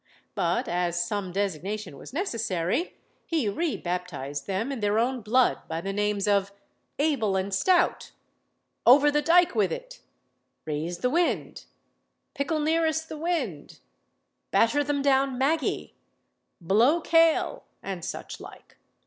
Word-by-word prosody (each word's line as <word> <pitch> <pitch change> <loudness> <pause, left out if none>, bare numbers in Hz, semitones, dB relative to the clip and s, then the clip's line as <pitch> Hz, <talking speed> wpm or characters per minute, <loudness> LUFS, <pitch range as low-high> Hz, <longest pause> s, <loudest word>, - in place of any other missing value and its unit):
But - - 0
as 175 0 0
some 200 -2 -3
designation 200 0 -3
was - - -11
necessary, 230 - -1 0.3
he 320 -9 0
re 315 +10 -1
baptised 170 -6 -4
them 200 +7 -2
in 270 - -4
their 205 0 +1
own 245 +2 0
blood 240 +4 +2
by 160 0 -3
the 195 +3 -4
names 205 0 0
of 200 -1 +2 0.5
"Able 275 -10 +1
and 190 +1 -1
Stout," 355 - +2 0.7
"Over 285 +4 +7
the 295 0 +2
dike 345 +2 +4
with 210 -5 +1
it," - - -7 0.6
"Raise 160 +3 -3
the 250 +8 0
wind," 345 +3 -1 0.7
"Pickle 310 +1 -1
nearest 320 0 +1
the 310 - -6
wind," 295 - -3 0.7
"Batter 285 +6 +3
them 285 -1 -1
down 270 -1 +2
Maggy," 280 +3 0 0.7
"Blow 225 - +3
Kale," 330 +8 +2 0.2
and 190 -4 -5
such - - -6
like. - - -13
230 Hz, 130 wpm, -26 LUFS, 190-310 Hz, 0.7 s, Over